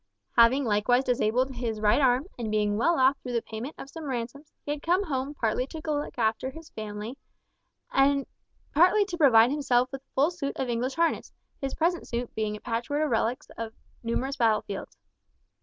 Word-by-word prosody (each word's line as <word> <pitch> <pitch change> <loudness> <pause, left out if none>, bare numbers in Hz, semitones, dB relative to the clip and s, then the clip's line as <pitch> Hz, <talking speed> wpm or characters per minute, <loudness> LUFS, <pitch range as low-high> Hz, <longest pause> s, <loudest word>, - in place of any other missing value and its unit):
Having 255 +4 +5
likewise 230 +4 +2
disabled 250 +1 +1
his 230 -3 -2
right 215 +6 +3
arm, 255 +1 +3
and 230 -3 -4
being 210 -1 +1
well 335 +11 +2
off 265 +2 +4
through 250 - -6
the 235 - +1
payment 230 +7 -6
of - - -8
some 320 +2 -8
ransoms, 260 +4 -5
he 290 - -2
had 295 -1 -3
come 360 +5 +2
home 280 -3 -3
partly 240 +1 0
to 320 - -7
look 295 -3 -2
after 225 +2 0
his 320 +3 -12
family, 215 +4 -6 0.7
and 275 0 +3 0.5
partly 365 +7 +5
to 375 -3 -5
provide 240 -5 +6
himself 255 -4 +1
with 270 -1 -6
a - - -50
full 285 +6 +3
suit 320 -6 -4
of 260 - -2
English 245 +3 -1
harness, 335 +1 0 0.3
his 270 -1 -3
present 340 +2 0
suit 240 0 -4
being 215 -1 -2
a - - -8
patchwork 250 +6 -1
of 295 - -3
relics 240 +5 -1
of 225 -1 -4 0.3
numerous 255 +4 -2
battle 220 -3 +3
fields. 195 - -7
255 Hz, 190 wpm, -27 LUFS, 230-290 Hz, 0.7 s, provide